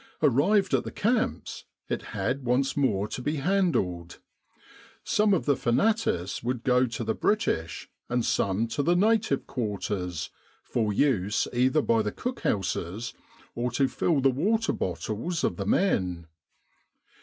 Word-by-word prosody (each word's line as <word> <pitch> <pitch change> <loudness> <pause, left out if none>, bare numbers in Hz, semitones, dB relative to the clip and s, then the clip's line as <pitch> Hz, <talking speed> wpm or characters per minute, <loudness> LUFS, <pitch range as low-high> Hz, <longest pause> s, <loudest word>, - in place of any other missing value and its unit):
Arrived 170 - +3
at - - +3
the - - -5
camps, 230 +2 -1 0.2
it - - -2
had 130 +3 -3
once 130 +3 +1
more 105 -8 +1
to 110 - -5
be 145 +5 -1
handled. 140 - 0 0.9
Some 210 0 +2
of 190 - +2
the 145 - +3
fanatis 120 - 0
would 120 0 -3
go 125 0 +3
to 115 0 -4
the 110 0 0
British 85 - -1 0.2
and 120 -1 0
some 100 +3 +1
to 130 - -1
the 170 +5 +2
native 210 -6 +2
quarters, 100 - -3 0.3
for 110 -3 -1
use 105 -4 +1
either 130 +5 +2
by 115 -1 +3
the 105 -1 -2
cookhouses 105 - -2 0.4
or 120 +1 -1
to 135 +2 +2
fill 150 +1 +1
the 135 0 +4
water 215 - +1
bottles 110 - -3
of - - 0
the - - -3
men. 90 - +1
125 Hz, 145 wpm, -27 LUFS, 105-165 Hz, 0.9 s, the